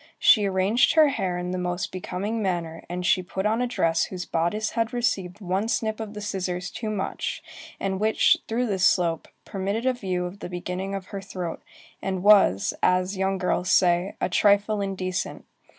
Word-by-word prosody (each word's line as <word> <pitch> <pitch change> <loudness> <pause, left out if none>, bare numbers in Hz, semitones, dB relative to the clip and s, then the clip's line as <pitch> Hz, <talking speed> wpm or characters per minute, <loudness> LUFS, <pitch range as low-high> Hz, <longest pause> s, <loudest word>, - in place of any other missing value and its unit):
She 210 -3 +5
arranged 195 +5 +3
her 310 -2 +6
hair 185 -9 -2
in 180 0 -3
the 185 - -2
most 180 0 -2
becoming 195 +4 -3
manner, 170 -4 -2
and 180 +1 -3
she 185 - +3
put 190 +2 -4
on 220 +3 +1
a 250 - +1
dress 165 -8 +1
whose 180 -1 -6
bodice 175 +7 -1
had 230 +1 -1
received 215 -6 -1
one 190 +3 -1
snip 220 -1 -1
of 220 -1 -6
the 210 - -6
scissors 180 -3 -3
too 220 - -4
much, 205 -3 -3 0.4
and 190 -1 -2
which, 215 +1 +4
through 235 +3 0
this 195 -5 -1
slope, 170 -3 +2 0.2
permitted 200 +4 -3
a 260 - +3
view 185 -7 -2
of 180 +3 -7
the 180 - -6
beginning 180 +2 -4
of 190 -1 -7
her 200 - -4
throat, 180 -3 -5 0.4
and 190 -1 -3
was, 200 - +5
as 185 +2 +2
young 190 0 0
girls 180 -1 -1
say, 180 +1 +3
"a - - +1
trifle 205 +2 +3
indecent." 185 -2 -3
190 Hz, 185 wpm, -25 LUFS, 180-210 Hz, 0.4 s, her